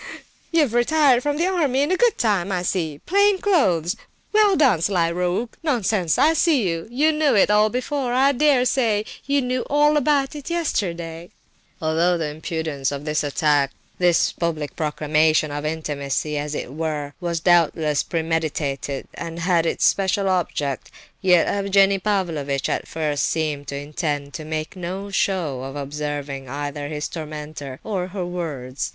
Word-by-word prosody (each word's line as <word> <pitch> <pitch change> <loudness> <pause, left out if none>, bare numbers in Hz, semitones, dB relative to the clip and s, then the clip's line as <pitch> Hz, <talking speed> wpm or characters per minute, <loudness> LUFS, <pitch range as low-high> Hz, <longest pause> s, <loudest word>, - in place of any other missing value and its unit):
You've 305 -8 +2
retired 255 +1 +4
from 290 +2 -1
the 335 - +1
army 295 -8 +1
in 340 +6 +1
good 480 +4 +3
time, 200 -5 +1
I 180 -2 -1
see! 160 -5 -2
Plain 400 +2 +4
clothes! 195 - +2 0.4
Well 420 -2 +5
done, 260 - +3
sly 170 -2 +1
rogue! 180 +7 -1
Nonsense! 215 - +1
I 300 +5 +5
see—you 255 - +1
knew 305 -4 +2
it 205 - +4
all 210 +1 +4
before—I 260 +1 +1
dare 280 -2 +3
say 225 -5 +1 0.2
you 280 -1 +2
knew 250 0 -1
all 295 +1 +4
about 285 -1 +1
it 290 +1 -7
yesterday 175 - -2 0.3
" - - -37
Although 165 +3 +2
the 160 -2 -2
impudence 155 -2 -3
of 140 +1 -5
this 150 -1 0
attack, 145 -1 +1 0.3
this 175 -2 +3
public 155 -5 -3
proclamation 155 0 +1
of 145 +1 -3
intimacy, 150 -1 -2
as 150 0 -3
it 130 - -5
were, 150 -2 -3
was 170 -1 -1
doubtless 160 -3 +3
premeditated, 155 -4 -2
and 165 0 -6
had 170 -1 +2
its - - +1
special 195 0 +2
object, 150 -7 -1 0.3
yet 180 -3 +5
Evgenie 195 0 +3
Pavlovitch 165 -9 -1
at - - -2
first 150 -4 -1
seemed 150 -3 -2
to 140 - -4
intend 145 0 -3
to 155 - -6
make 155 +3 -4
no 190 +3 -5
show 175 -10 0
of 135 +1 -7
observing 145 -2 -4
either 145 +1 -4
his 150 0 -3
tormentor 150 -4 -7
or 190 -4 -2
her 185 -1 -4
words. 145 -8 -4
170 Hz, 155 wpm, -22 LUFS, 150-240 Hz, 0.4 s, Well